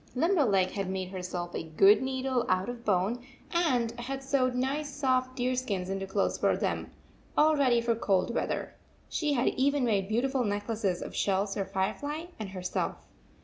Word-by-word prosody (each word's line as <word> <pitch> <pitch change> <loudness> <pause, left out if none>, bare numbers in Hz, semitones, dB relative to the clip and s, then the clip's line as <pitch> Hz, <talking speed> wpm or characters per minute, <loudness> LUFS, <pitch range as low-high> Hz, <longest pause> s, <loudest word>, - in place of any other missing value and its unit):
Limberleg 250 - +3
had 195 -2 -3
made 190 -1 -3
herself 180 -2 -5
a - - -2
good 180 +6 +5
needle 260 -1 0
out 185 +4 +1
of 240 -1 -6
bone 210 +4 +1 0.3
and 255 -10 +2
had 270 +3 -4
sewed 260 -2 +1
nice 275 +4 -1
soft 255 -2 0
deer 255 0 0
skins 200 -7 -2
into 195 0 -3
clothes 195 +1 0
for - - +2
them, - - -2 0.5
all 310 +1 +6
ready 265 -4 +3
138 235 - +2
for 230 -1 +2
cold 195 +3 +2
weather. - - -2 0.4
She 300 -3 0
had 250 -2 +2
even 280 0 +1
made 200 -4 +1
beautiful 255 +4 +1
necklaces 205 -3 -1
of - - -8
shells 195 0 +1
for 195 -1 -2
Firefly 215 - -2 0.2
and 215 -3 -4
herself. 185 -1 -2
235 Hz, 175 wpm, -29 LUFS, 195-265 Hz, 0.5 s, all